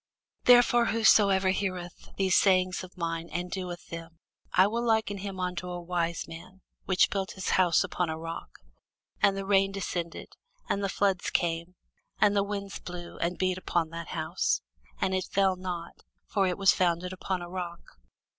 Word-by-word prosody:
Therefore 245 -1 +6
whosoever 200 -4 +4
heareth 185 -3 -4
these 190 -2 +2
sayings 185 -1 +3
of 185 0 -12
mine, 165 -1 -3
and 180 +1 -4
doeth 180 -2 -5
them, 165 -1 -8 0.3
I 185 - +6
will 230 +4 -1
liken 220 -3 +1
him 195 -1 -5
unto 180 0 -3
a 175 0 -4
wise 170 -1 -2
man, 180 +3 -11 0.2
which 190 -1 +3
built 195 -1 -2
his 190 - -4
house 180 -3 +4
upon 180 -2 -2
a 160 - -3
rock: 165 +1 -6 0.7
and 195 -1 +4
the 195 - -3
rain 195 0 +3
descended, 175 -4 -4 0.4
and 200 - -1
the 195 - 0
floods 195 -2 +1
came, 170 +1 -1 0.4
and 205 -1 +4
the 200 - +4
winds 200 -1 -4
blew, 175 -1 -8
and 175 +1 -1
beat 185 0 0
upon 170 -3 0
that 165 -1 -6
house; 160 +2 -1 0.4
and 190 - 0
it 185 -1 0
fell 195 -1 +2
not: 180 -2 -6 0.3
for 195 -3 +1
it 180 - -1
was 195 -1 +6
founded 180 0 0
upon 185 -1 -3
a - - -7
rock. 175 -1 -5
185 Hz, 175 wpm, -28 LUFS, 175-195 Hz, 0.7 s, Therefore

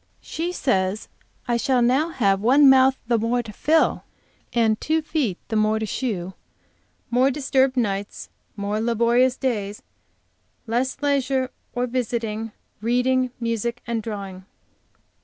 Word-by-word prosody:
She 335 +3 -3
says 200 - -1 0.4
I 240 -1 +1
shall 250 0 +2
now 265 +7 +2
have 200 -10 +1
one 275 +6 +6
mouth 265 0 +6
the 235 -1 +1
more 240 +2 0
to 215 -2 -10
fill, 315 +7 +2 0.5
and 225 -2 +1
two 315 0 0
feet 280 - -1
the 225 - -2
more 215 0 +2
to 220 - -2
shoe; 195 -6 -3 0.8
more 255 +3 +4
disturbed 265 -1 +1
nights, 200 -4 -2 0.3
more 205 +1 -2
laborious 235 +2 +2
days, 210 -5 -3 0.8
and 225 - -9
less 255 +3 0
leisure 270 -2 +1 0.2
for 245 0 -1
visiting, 230 -3 -3 0.3
reading, 250 +2 +1
music, 235 +1 -2
and 235 -2 -2
drawing. 195 -4 -7
235 Hz, 135 wpm, -23 LUFS, 215-260 Hz, 0.8 s, one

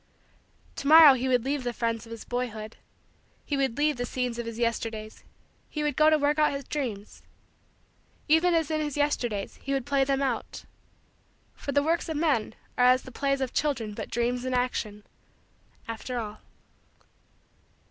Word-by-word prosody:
To 280 - -4
morrow 310 -2 +10
he 260 0 -1
would 250 -2 +2
leave 280 0 -1
the 245 -1 -2
friends 230 -1 -2
of - - -13
his 230 -1 -8
boyhood; 225 -3 -4 0.7
he 290 - -1
would 270 -4 0
leave 295 -1 +2
the 245 - -2
scenes 250 -2 -2
of 235 - -4
his 230 -1 -6
Yesterdays; 225 -2 -3 0.5
he 300 - -3
would 295 -2 0
go 310 0 +5
to 310 - +4
work 295 +1 +1
out 300 -1 +3
his 275 0 -4
dreams 235 -8 -5 1.1
even 330 +3 +4
as 325 -1 0
in 310 0 0
his 295 -1 -3
Yesterdays, 240 -8 -1
he 275 - -3
would 270 -3 -1
play 280 -1 +2
them 275 0 0
out 270 - -3 0.9
for 280 - -5
the 285 0 +2
works 330 +2 0
of 315 - -2
men 285 -9 0 0.2
are 250 - +6
as 255 +1 +5
the 260 - -11
plays 275 +2 -1
of 260 -2 -2
children 265 -8 -1
but - - -6
dreams 245 +1 -1
in 255 0 -1
action, 215 -4 -2 0.8
after 230 +2 -5
all. 215 -2 -5
255 Hz, 180 wpm, -27 LUFS, 230-290 Hz, 1.1 s, morrow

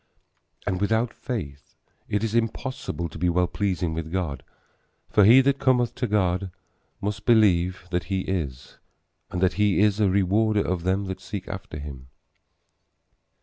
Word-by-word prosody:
And 95 0 -1
without 110 +3 +1
faith 75 - -6 0.3
it 105 +1 0
is 110 -1 -1
impossible 115 -5 -2
to 80 - -10
be 90 +1 +2
well 90 +1 +2
pleasing 90 -3 -1
with 80 0 -5
God; 85 -8 -2 0.7
for 105 - +5
he 120 +5 +8
that 140 +1 +1
cometh 125 -2 +2
to 125 - -2
God 95 -2 +1 0.5
must 100 0 -3
believe 90 -6 +3
that 90 -1 -1
he 95 -2 -1
is, 70 -10 -4 0.5
and 90 - -3
that 95 - +3
he 105 -2 +3
is 105 0 +3
a 105 -2 +4
rewarder 100 +3 +2
of 90 -1 -2
them 95 +2 +1
that 95 -1 -5
seek 95 +1 -6
after 95 -5 -7
him. 70 -3 -8
95 Hz, 155 wpm, -25 LUFS, 90-105 Hz, 0.7 s, he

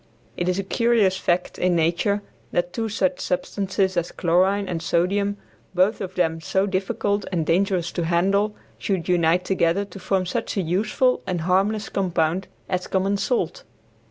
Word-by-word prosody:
It 175 +4 -1
is 180 - 0
a 195 - -1
curious 225 -2 +2
fact 180 -1 -1
in 180 -1 +2
nature 175 +5 +1 0.3
that 175 0 -1
two 225 +2 -2
such 185 -4 0
substances 190 +1 -1
as 175 0 -1
chlorine 190 +4 +2
and 170 -3 -3
sodium, 200 +4 +1 0.4
both 190 +4 +2
of 185 -1 -5
them 165 -2 0
so 190 +4 +1
difficult 200 +1 -1
and 165 -4 0
dangerous 180 0 +1
to 170 - -2
handle, 195 +5 +2 0.2
should 190 -4 -1
unite 175 0 +2
together 190 +1 +1
to 195 0 -11
form 190 0 0
such 180 - -3
a - - +2
useful 215 +9 +1
and 180 -3 -1
harmless 195 +5 +1
compound 180 -1 0 0.2
as 180 -1 -2
common 195 +1 +1
salt. 200 -6 -1
185 Hz, 160 wpm, -23 LUFS, 175-200 Hz, 0.4 s, curious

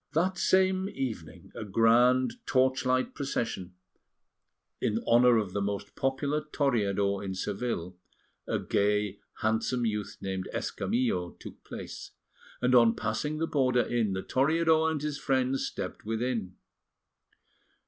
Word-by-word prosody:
That 185 +3 +1
same 190 0 +3
evening 120 - -6
a - - -6
grand 120 - +3
torchlight 130 -1 +2
procession 115 - -3 1.1
in 110 - +1
honour 120 0 +5
of 100 -4 -1
the 100 - -1
most 100 0 -3
popular 140 +3 0
Toreador 100 -10 0
in 95 -1 -4
Seville, 95 -2 -3 0.5
a - - 0
gay, 105 0 0 0.2
handsome 110 +3 +1
youth 105 -2 -3
named 95 -1 -4
Escamillo, 105 -8 -1
took - - -11
place; - - -8 0.5
and 125 +1 +3
on 115 -2 +6
passing 130 +8 -2
the 165 - 0
border 130 -5 +2
inn, 115 -5 0
the 95 - -3
Toreador 160 +3 +3
and 160 -2 -1
his 150 -1 -3
friends 130 0 0
stepped - - -6
within. 115 -3 -2
120 Hz, 125 wpm, -29 LUFS, 105-135 Hz, 1.1 s, on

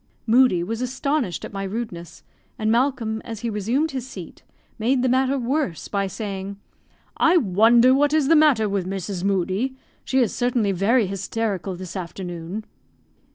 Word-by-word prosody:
Moodie 235 -6 +4
was 225 +6 -4
astonished 260 - -1
at - - -10
my 195 - -4
rudeness; 195 -4 -6 0.3
and 215 0 0
Malcolm, 235 -3 0
as 225 -3 -7
he 235 - -2
resumed 235 +10 0
his 260 -2 -5
seat, 185 -9 -10 0.4
made 250 +3 +1
the - - +3
matter 260 +2 +2
worse 255 - -2
by 200 -1 -1
saying, 195 -1 -5 0.6
"I 330 +2 +5
wonder 235 - +5
what 290 +2 +3
is 305 -3 +2
the 325 - +5
matter 290 -9 +4
with 195 -2 -2
Mrs. 190 -1 -4
Moodie; 195 +6 0 0.3
she 265 - -1
is 245 -5 +2
certainly 240 -4 +1
very 205 +6 +2
hysterical 195 0 -3
this 185 +1 -8
afternoon." 180 +2 -6
220 Hz, 155 wpm, -23 LUFS, 195-255 Hz, 0.6 s, I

